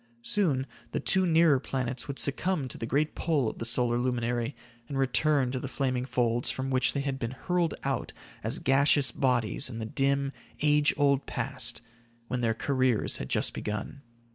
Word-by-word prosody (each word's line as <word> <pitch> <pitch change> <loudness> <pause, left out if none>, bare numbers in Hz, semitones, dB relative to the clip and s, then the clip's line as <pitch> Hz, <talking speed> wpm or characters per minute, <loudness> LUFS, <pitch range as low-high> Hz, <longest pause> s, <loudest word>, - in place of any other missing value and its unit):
Soon, 150 - +1 0.3
the - - 0
two 190 -1 +3
nearer 165 -4 +5
planets 130 -1 -3
would 140 -1 -5
succumb 150 +1 0
to - - -7
the 115 - -4
great 145 +5 +1
pull 150 -7 0
of - - -5
the 115 - -3
solar 120 0 +3
luminary 120 -1 -1 0.3
and 140 - -3
return 135 0 +2
to 130 - -2
the 135 - -5
flaming 130 -2 -1
folds, 120 -2 0
from 135 0 -3
which 130 -1 +2
they 140 - -1
had 135 -1 -3
been 115 - -2 0.2
hurled 180 -2 +1
out 135 -3 -2 0.3
as - - +1
gaseous 135 0 +3
bodies 125 -3 +1
in 115 - -7
the 110 - -4
dim, 140 +3 0 0.3
age 150 0 +4
old 140 -1 +2
past, 120 -4 -2 0.5
when 125 -1 -1
their 115 -2 +1
careers 130 -3 +1
had 65 - -6
just - - +2
begun. 105 +6 -5
135 Hz, 180 wpm, -28 LUFS, 120-140 Hz, 0.5 s, nearer